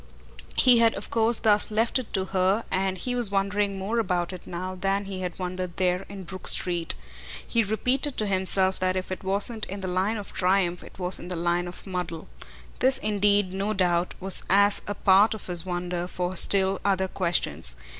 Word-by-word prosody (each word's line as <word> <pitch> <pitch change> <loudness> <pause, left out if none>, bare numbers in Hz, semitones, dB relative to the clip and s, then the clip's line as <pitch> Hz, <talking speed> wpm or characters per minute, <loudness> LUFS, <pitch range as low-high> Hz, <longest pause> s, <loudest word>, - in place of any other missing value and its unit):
He 250 -2 +6
had 230 -1 +3
of 200 - -7
course 230 0 +3
thus 210 -1 +3
left 225 +4 +1
it 250 - -8
to 190 -2 0
her 190 +3 0
and 190 0 -1
he 250 +6 -3
was 240 -4 +4
wondering 200 0 -1
more 205 +5 -2
about 180 -4 -1
it 180 - -10
now 185 +2 -5
than 195 +2 -1
he 190 -1 -6
had 180 -2 -5
wondered 180 -1 -5
there 180 0 0
in 195 -1 -8
Brook 185 +1 -8
Street. 175 -2 +2 0.5
He 230 - +2
repeated 250 +6 0
to 215 - 0
himself 190 -1 +1
that 185 0 0
if 185 0 -4
it 185 - -5
wasn't 205 +4 0
in 200 +1 -7
the 190 - -4
line 190 +5 0
of 205 - -8
triumph 180 -1 +1
it - - -14
was 180 0 0
in 175 - -9
the 180 - -4
line 175 +1 -1
of 175 - -9
muddle. 180 -4 -5 0.5
This 260 +1 +3
indeed, 205 -4 +1
no 200 +3 -2
doubt, 180 -2 0
was 190 0 +2
as 200 +1 +4
a 205 - -3
part 200 +3 +4
of 215 - -10
his 175 0 -1
wonder 175 0 -3
for 180 0 -4
still 190 +1 +2
other 190 -1 +1
questions. 85 - +3
190 Hz, 200 wpm, -25 LUFS, 180-205 Hz, 0.5 s, He